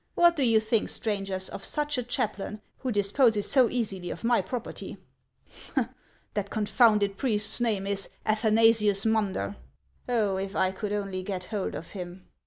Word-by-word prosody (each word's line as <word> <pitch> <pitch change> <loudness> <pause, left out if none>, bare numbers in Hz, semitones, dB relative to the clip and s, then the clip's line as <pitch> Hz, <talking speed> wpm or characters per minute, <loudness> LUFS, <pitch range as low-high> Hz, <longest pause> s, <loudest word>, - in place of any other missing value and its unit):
What 345 0 +5
do 295 - -1
you 230 -4 +5
think, 220 0 0
strangers, 195 -3 -2
of 195 - -7
such 295 -1 -1
a 250 - 0
chaplain, 215 -4 -2 0.2
who 255 - -2
disposes 205 +1 +3
so 255 -4 +5
easily 195 -7 -2
of - - -6
my 235 -2 +3
property? 235 +6 -6 1.4
That 205 -1 -2
confounded 210 -2 +3
priest's 215 -3 0
name 215 -5 +1
is 200 -1 -2 0.2
Athanasius 215 -1 +4
Munder. 210 -2 0 0.5
Oh, 210 -6 +1
if 195 +1 -4
I 185 - +2
could 205 +2 -4
only 195 -2 -2
get 185 -1 -4
hold 205 -2 -2
of 165 - -7
him 180 -1 -8
210 Hz, 155 wpm, -28 LUFS, 195-230 Hz, 1.4 s, What